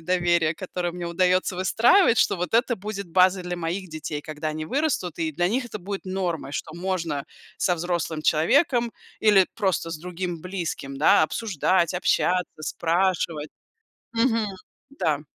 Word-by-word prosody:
доверие, 170 Hz, -2 st, +2 dB
которое 180 Hz, -2 st, -3 dB
мне 175 Hz, 0 st, -6 dB
удаётся 185 Hz, +2 st, +2 dB
выстраивать, 230 Hz, -, +4 dB
что -, -, +3 dB
вот 180 Hz, +1 st, -3 dB
это 240 Hz, +1 st, +3 dB
будет 200 Hz, -1 st, -6 dB
базой 185 Hz, +1 st, +3 dB
для 180 Hz, 0 st, -3 dB
моих 175 Hz, +3 st, -3 dB
детей, 155 Hz, -2 st, -5 dB
когда 155 Hz, +1 st, -5 dB
они 155 Hz, 0 st, -4 dB
вырастут, 265 Hz, -, -1 dB
и 160 Hz, -1 st, 0 dB
для 175 Hz, +4 st, 0 dB
них 250 Hz, +5 st, 0 dB
это 215 Hz, -, -7 dB
будет 195 Hz, +2 st, -6 dB
нормой, 185 Hz, -6 st, -3 dB
что 155 Hz, +2 st, -5 dB
можно 170 Hz, -5 st, -2 dB, 0.3 s
со 180 Hz, -3 st, +2 dB
взрослым 170 Hz, -2 st, -2 dB
человеком 235 Hz, -, +3 dB, 0.3 s
или 205 Hz, -4 st, +5 dB
просто 190 Hz, -6 st, 0 dB
с 155 Hz, -, -5 dB
другим 175 Hz, -1 st, -5 dB
близким, 170 Hz, -7 st, -5 dB
да, 150 Hz, +2 st, +5 dB
обсуждать, 185 Hz, -2 st, +1 dB
общаться, 180 Hz, -2 st, 0 dB
спрашивать. 165 Hz, -1 st, 0 dB, 0.6 s
Мгм. 230 Hz, -1 st, +2 dB, 0.4 s
Да. 155 Hz, -, -1 dB
180 Hz, 150 wpm, -25 LUFS, 165-195 Hz, 0.6 s, или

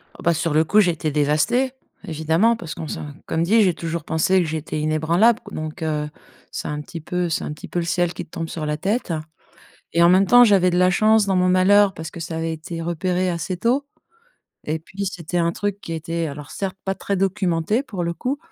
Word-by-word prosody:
Ah, -, -, -17 dB
bah, 170 Hz, -, +3 dB
sur 165 Hz, 0 st, -1 dB
le 155 Hz, +1 st, +4 dB
coup, 205 Hz, +7 st, +3 dB
j'étais 165 Hz, -6 st, +1 dB
dévastée, 155 Hz, -, +2 dB, 0.3 s
évidemment, 165 Hz, +7 st, +2 dB
parce 170 Hz, -8 st, -6 dB
qu'on 160 Hz, -, -6 dB
se -, -, -5 dB, 0.3 s
comme 160 Hz, -, 0 dB
dit, 220 Hz, +6 st, +4 dB
j'ai 185 Hz, -4 st, +3 dB
toujours 165 Hz, -1 st, -4 dB
pensé 160 Hz, +5 st, +2 dB
que -, -, 0 dB
j'étais 155 Hz, 0 st, -3 dB
inébranlable 165 Hz, +9 st, +3 dB
donc, 155 Hz, 0 st, -5 dB
heu, 150 Hz, -1 st, -1 dB, 0.4 s
c'est -, -, -5 dB
un 150 Hz, 0 st, -3 dB
petit 165 Hz, +2 st, -8 dB
peu 180 Hz, +2 st, -2 dB
c'est 160 Hz, -, -1 dB
un -, -, -4 dB
petit 150 Hz, -, -10 dB
peu 175 Hz, -, -1 dB
le 170 Hz, -, -2 dB
ciel 175 Hz, 0 st, 0 dB
qui -, -, -6 dB
te -, -, -33 dB
tombe 165 Hz, -1 st, -5 dB
sur 155 Hz, -2 st, -4 dB
la 150 Hz, 0 st, -1 dB
tête 195 Hz, +2 st, -1 dB, 0.8 s
et 170 Hz, -, +3 dB
en 170 Hz, -, +7 dB
même 185 Hz, +2 st, +5 dB
temps, 245 Hz, +3 st, +8 dB
j'avais 195 Hz, -4 st, +4 dB
de 175 Hz, -, 0 dB
la 180 Hz, 0 st, +5 dB
chance 215 Hz, +2 st, +4 dB
dans 195 Hz, -1 st, +1 dB
mon 180 Hz, 0 st, +3 dB
malheur. 195 Hz, +2 st, +5 dB
Parce 160 Hz, 0 st, -7 dB
que 170 Hz, -, -9 dB
ça 160 Hz, 0 st, -5 dB
avait 165 Hz, 0 st, -2 dB
été 165 Hz, +1 st, -7 dB
repéré 180 Hz, +2 st, -1 dB
assez 175 Hz, +1 st, -3 dB
tôt 250 Hz, +8 st, +1 dB, 0.8 s
et 155 Hz, +1 st, -2 dB
puis, 195 Hz, +5 st, -6 dB
c'était 175 Hz, -2 st, -3 dB
un 170 Hz, 0 st, +1 dB
truc 205 Hz, +2 st, -3 dB
qui 165 Hz, -, -7 dB
était 165 Hz, +1 st, -3 dB
alors 145 Hz, 0 st, -8 dB
certes, 195 Hz, -1 st, -4 dB
pas 195 Hz, 0 st, -1 dB
très 200 Hz, -, -2 dB
documenté, 190 Hz, -, 0 dB
pour 195 Hz, -9 st, -5 dB
le 170 Hz, 0 st, -1 dB
coup, 255 Hz, -, -3 dB
170 Hz, 230 wpm, -22 LUFS, 160-195 Hz, 0.8 s, temps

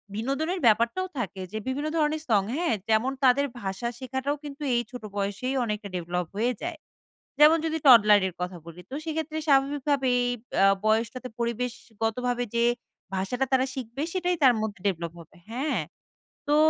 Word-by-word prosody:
বিনোদনের 275 Hz, -, -1 dB
ব্যাপারটাও 235 Hz, -, +3 dB
থাকে 195 Hz, -4 st, -4 dB
যে, 215 Hz, -, -4 dB
বিভিন্ন 285 Hz, +4 st, -1 dB
ধরনের 305 Hz, 0 st, +1 dB
সং, 210 Hz, -3 st, +5 dB
হ্যাঁ? 340 Hz, -6 st, +1 dB, 0.2 s
যেমন 220 Hz, +4 st, +3 dB
তাদের 265 Hz, +2 st, +5 dB, 0.2 s
ভাষা 195 Hz, +4 st, -3 dB
শেখাটাও 265 Hz, +2 st, -2 dB
কিন্তু 290 Hz, 0 st, -8 dB
এই 240 Hz, -, +3 dB
ছোট 250 Hz, -3 st, -8 dB
বয়সেই 205 Hz, +7 st, -2 dB
অনেকটা 210 Hz, -2 st, -3 dB
ডেভেলপ 175 Hz, 0 st, -2 dB
হয়ে 245 Hz, +3 st, +1 dB
যায়। 335 Hz, -2 st, -4 dB, 0.6 s
যেমন 315 Hz, +2 st, +8 dB
যদি 320 Hz, 0 st, -1 dB
toddler 210 Hz, -5 st, +8 dB
এর 175 Hz, -, -10 dB
কথা 180 Hz, 0 st, -3 dB
বলি, 170 Hz, +1 st, -10 dB
তো -, -, -5 dB
সেইক্ষেত্রে 315 Hz, -1 st, -3 dB
স্বাভাবিকভাবেই 275 Hz, -2 st, +2 dB, 0.4 s
আ -, -, +7 dB, 0.2 s
বয়সটাতে 230 Hz, +4 st, 0 dB
পরিবেশগতভাবে, 235 Hz, 0 st, -2 dB
যে 235 Hz, 0 st, +3 dB, 0.5 s
ভাষাটা 245 Hz, +8 st, -1 dB
তারা 260 Hz, 0 st, +4 dB
শিখবে, 260 Hz, +2 st, -5 dB
সেটাই 360 Hz, -1 st, 0 dB
তার 255 Hz, -3 st, +7 dB
মধ্যে 210 Hz, -3 st, -4 dB
ডেভেলপ 170 Hz, -4 st, -1 dB
হবে 165 Hz, -, -16 dB
হ্যাঁ, 255 Hz, -, -1 dB, 0.7 s
তো 295 Hz, -, +3 dB
250 Hz, 155 wpm, -27 LUFS, 215-285 Hz, 0.7 s, যেমন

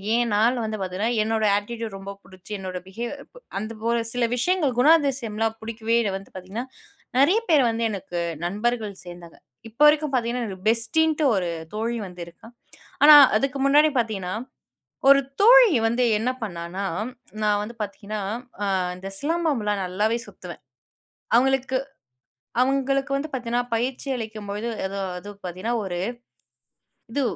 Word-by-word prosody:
ஏன்னா 235 Hz, -3 st, +1 dB, 0.3 s
வந்து 215 Hz, 0 st, -3 dB
பார்த்தீங்கன்னா, 190 Hz, +5 st, -1 dB
என்னோட 220 Hz, 0 st, 0 dB
அட்டிட்யூட் 225 Hz, 0 st, -6 dB
ரொம்ப 195 Hz, 0 st, -7 dB
புடிச்சு, 185 Hz, +2 st, -15 dB
என்னோட 185 Hz, -1 st, -5 dB
பிஹேவ் 235 Hz, +7 st, -5 dB, 0.5 s
அந்த 215 Hz, +2 st, -6 dB, 0.2 s
ஒரு 235 Hz, 0 st, +1 dB
சில 245 Hz, -1 st, +1 dB
விஷயங்கள், 305 Hz, +1 st, +1 dB
குணாதிசயம்லாம் 250 Hz, -7 st, +2 dB
புடிக்கவே 225 Hz, +1 st, -2 dB, 0.2 s
வந்து 195 Hz, -, -13 dB
பார்த்தீங்கன்னா, 190 Hz, +6 st, -6 dB, 0.5 s
நெறைய 345 Hz, +11 st, +5 dB
பேர் 300 Hz, -5 st, +5 dB
வந்து 230 Hz, 0 st, -2 dB
எனக்கு 180 Hz, -3 st, -5 dB, 0.3 s
நண்பர்கள் 215 Hz, +3 st, -1 dB
சேர்ந்தாங்க. 175 Hz, -1 st, -11 dB, 0.3 s
இப்ப 230 Hz, +6 st, -12 dB
வரைக்கும் 300 Hz, -1 st, +3 dB
பார்த்தீங்கன்னா, 240 Hz, -1 st, 0 dB
எனக்கு 190 Hz, 0 st, -6 dB
பெஸ்ட்டீன்ட்டு 305 Hz, +7 st, +1 dB
ஒரு 180 Hz, -3 st, -1 dB, 0.3 s
தோழி 230 Hz, +2 st, -2 dB
வந்து 180 Hz, -1 st, -10 dB
இருக்கா. 170 Hz, -, -15 dB, 0.6 s
ஆனா 300 Hz, +1 st, +11 dB, 0.2 s
அதுக்கு 275 Hz, +5 st, 0 dB
முன்னாடி 295 Hz, +3 st, +5 dB
பார்த்தீங்கன்னா, 200 Hz, -6 st, -2 dB, 0.8 s
ஒரு 275 Hz, 0 st, +8 dB, 0.2 s
தோழி 485 Hz, +1 st, +8 dB, 0.2 s
வந்து 235 Hz, +2 st, +1 dB, 0.2 s
என்ன 235 Hz, +3 st, 0 dB
பண்ணான்னா? 175 Hz, 0 st, -5 dB, 0.6 s
"நான் 210 Hz, -1 st, +2 dB
வந்து 235 Hz, +3 st, -8 dB
பார்த்தீங்கன்னா, 205 Hz, +1 st, -5 dB, 0.4 s
அ -, -, +1 dB, 0.3 s
இந்த 190 Hz, +1 st, -7 dB
சிலம்பம்ல்லா 290 Hz, -9 st, 0 dB
நல்லாவே 205 Hz, +5 st, 0 dB
சுத்துவேன்." -, -, -11 dB, 0.7 s
அவங்களுக்கு, 265 Hz, +1 st, +3 dB, 0.8 s
அவங்களுக்கு 275 Hz, +1 st, +1 dB
வந்து 285 Hz, +3 st, -3 dB
பார்த்தீங்கன்னா 245 Hz, -1 st, -1 dB
பயிற்சி 250 Hz, +4 st, -2 dB
அளிக்கும்போது 215 Hz, -1 st, -5 dB, 0.2 s
எதோ 195 Hz, +1 st, -4 dB, 0.2 s
அது 205 Hz, +3 st, -9 dB, 0.2 s
பார்த்தீங்கன்னா 185 Hz, +7 st, -3 dB
ஒரு, 180 Hz, -2 st, -4 dB, 1.2 s
இது 285 Hz, -, 0 dB
230 Hz, 130 wpm, -24 LUFS, 200-265 Hz, 1.2 s, ஆனா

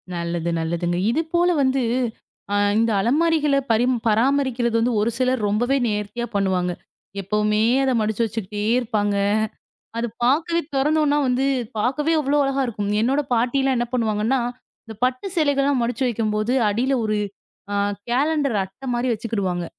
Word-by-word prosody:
நல்லது, 170 Hz, 0 st, -2 dB
நல்லதுங்க. 170 Hz, +2 st, -1 dB
இது 310 Hz, -, +1 dB
போல 350 Hz, +1 st, +4 dB
வந்து 265 Hz, 0 st, +1 dB, 0.7 s
அ -, -, +2 dB, 0.2 s
இந்த 230 Hz, 0 st, +2 dB
அலமாரிகளைப் 290 Hz, +2 st, +2 dB
பரி 225 Hz, +2 st, +3 dB, 0.2 s
பராமரிக்கிறது 240 Hz, +1 st, +1 dB
வந்து 240 Hz, +2 st, +1 dB
ஒரு 220 Hz, -, +1 dB
சிலர் 255 Hz, -1 st, +1 dB
ரொம்பவே 245 Hz, +7 st, +1 dB
நேர்த்தியாக 210 Hz, +2 st, -3 dB
பண்ணுவாங்க. 190 Hz, -3 st, 0 dB, 0.5 s
எப்பவுமே 210 Hz, +2 st, 0 dB, 0.2 s
அதை 265 Hz, -1 st, +2 dB
மடிச்சு 215 Hz, +1 st, -1 dB
வைச்சுக்கிட்டே 210 Hz, -1 st, -4 dB, 0.2 s
இருப்பாங்க. 210 Hz, -4 st, -1 dB, 0.8 s
அது 235 Hz, -, 0 dB, 0.2 s
பார்க்கவே 320 Hz, +6 st, +2 dB
திறந்தோம் 300 Hz, +3 st, +2 dB
என்றால் 290 Hz, 0 st, +2 dB
வந்து 255 Hz, +2 st, +1 dB, 0.3 s
பார்க்கவே 290 Hz, +8 st, 0 dB
அவ்வளவு 290 Hz, 0 st, +2 dB
அழகாக 275 Hz, 0 st, 0 dB
இருக்கும். 205 Hz, -4 st, -3 dB
என்னோட 265 Hz, +6 st, +2 dB
பாட்டி 240 Hz, +3 st, +1 dB
எல்லாம் 265 Hz, -1 st, +1 dB
என்ன 240 Hz, -, 0 dB
பண்ணுவாங்க 220 Hz, -4 st, 0 dB
என்றால், 245 Hz, -1 st, +1 dB, 0.4 s
இந்த 220 Hz, -, -8 dB
பட்டு 255 Hz, +6 st, -1 dB
சேலைகள் 285 Hz, -3 st, +2 dB
எல்லாம் 280 Hz, -2 st, +1 dB
மடிச்சு 235 Hz, +2 st, -2 dB
வைக்கும்போது 215 Hz, 0 st, -1 dB
அடியில் 245 Hz, +6 st, +1 dB
ஒரு 215 Hz, 0 st, 0 dB, 0.6 s
ஆ -, -, -1 dB, 0.3 s
கேலண்டர் 280 Hz, 0 st, +1 dB
அட்டை 195 Hz, +8 st, -10 dB
மாதிரி 245 Hz, +1 st, 0 dB
வைச்சுக்கிடுவாங்க. 200 Hz, -6 st, -2 dB
240 Hz, 150 wpm, -22 LUFS, 210-270 Hz, 0.8 s, போல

